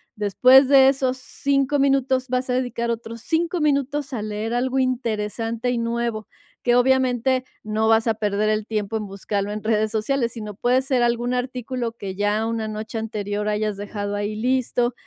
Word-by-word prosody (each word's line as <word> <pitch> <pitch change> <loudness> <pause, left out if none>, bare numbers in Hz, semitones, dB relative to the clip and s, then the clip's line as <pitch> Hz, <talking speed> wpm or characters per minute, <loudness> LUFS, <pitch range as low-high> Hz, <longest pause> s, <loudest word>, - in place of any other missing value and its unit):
Después 255 +6 +5
de 270 -1 +7
esos 260 -1 0
5 275 +2 0
minutos 265 -2 +2
vas 255 0 -1
a - - +1
dedicar 245 -2 -1
otros 230 0 -6
5 340 +5 0
minutos 285 -1 0
a 230 - -2
leer 215 +2 -3
algo 255 +2 0
interesante 230 -1 -1
y 245 - -1
nuevo, 230 -2 -2 0.3
que 240 -1 +3
obviamente 255 0 +2 0.2
no 215 +1 0
vas 225 +1 +4
a 225 - +1
perder 210 0 0
el 215 0 -1
tiempo 215 0 -2
en 215 -1 -5
buscarlo 200 +1 -3
en 210 0 -5
redes 215 -1 +1
sociales, 230 +2 0
sino 210 -3 -6
puede 250 +4 +2
ser 260 -2 +1
algún 240 +1 0
artículo 250 -1 -3
que 200 -4 -6
ya 205 +2 0
una 225 -1 -2
noche 215 +1 -5
anterior 210 -1 -3
hayas 210 0 -1
dejado 205 0 -4
ahí 205 +1 -2
listo, 245 +1 0
235 Hz, 175 wpm, -23 LUFS, 215-255 Hz, 0.3 s, de